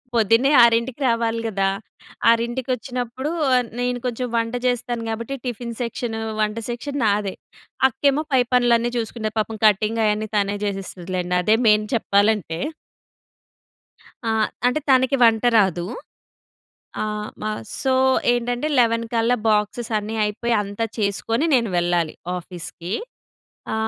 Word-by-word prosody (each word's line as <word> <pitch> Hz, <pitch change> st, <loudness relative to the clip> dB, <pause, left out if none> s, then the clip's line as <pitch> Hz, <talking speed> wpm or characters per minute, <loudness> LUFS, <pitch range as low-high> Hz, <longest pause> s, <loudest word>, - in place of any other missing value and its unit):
పొద్దున్నే 230 Hz, +5 st, +4 dB
6కి 235 Hz, +3 st, +2 dB
రావాలి 230 Hz, -1 st, +1 dB
గదా! 195 Hz, -3 st, 0 dB, 0.6 s
ఆరింటికొచ్చినప్పుడు 245 Hz, +2 st, -1 dB, 0.2 s
ఆహ్, 250 Hz, -1 st, +3 dB
నేను 245 Hz, 0 st, -1 dB
కొంచెం 250 Hz, 0 st, -2 dB
వంట 230 Hz, 0 st, 0 dB
చేస్తాను, 240 Hz, -1 st, -1 dB
కాబట్టి 230 Hz, +4 st, -4 dB
టిఫిన్ 240 Hz, -1 st, -4 dB
సెక్షను, 230 Hz, -1 st, -3 dB, 0.2 s
వంట 210 Hz, 0 st, 0 dB
సెక్షన్ 275 Hz, +4 st, -4 dB
నాదే. 205 Hz, -2 st, +1 dB, 0.5 s
అక్కేమో 280 Hz, +3 st, +1 dB
పై 260 Hz, -, +5 dB
పనులన్నీ 240 Hz, -1 st, +3 dB
చూసుకుండే. 220 Hz, -1 st, -3 dB
పాపం 220 Hz, +1 st, -2 dB
కటింగయన్నీ 215 Hz, +1 st, +2 dB
తనే 205 Hz, 0 st, +1 dB
చేసేస్తదిలెండి. 185 Hz, -2 st, -3 dB
అదే 215 Hz, +4 st, +4 dB
మెయిన్ 210 Hz, 0 st, +4 dB
చెప్పాలంటే. 200 Hz, -6 st, +1 dB, 1.7 s
ఆ! -, -, 0 dB, 0.4 s
అంటే, 250 Hz, +5 st, +1 dB
తనకి 260 Hz, 0 st, +4 dB
వంట 225 Hz, -1 st, +4 dB
రాదు. 185 Hz, -5 st, +2 dB, 1.2 s
ఆ! -, -, 0 dB, 0.4 s
మ -, -, -4 dB, 0.4 s
సో 265 Hz, -, +1 dB, 0.4 s
ఏంటంటే, 245 Hz, +4 st, -1 dB
11 230 Hz, -1 st, +2 dB
కల్లా 230 Hz, +2 st, +2 dB
బాక్సెస్ 215 Hz, +2 st, 0 dB
అన్నీ 210 Hz, +1 st, -5 dB
అయిపోయి 230 Hz, +3 st, -1 dB
అంతా 205 Hz, +3 st, -3 dB
చేసుకొని 220 Hz, +6 st, 0 dB
నేను 235 Hz, -3 st, +2 dB
వెళ్ళాలి 175 Hz, -2 st, +1 dB, 0.2 s
ఆఫీస్‌కి. 175 Hz, 0 st, -7 dB, 0.8 s
ఆ! -, -, 0 dB
230 Hz, 120 wpm, -22 LUFS, 210-245 Hz, 1.7 s, పై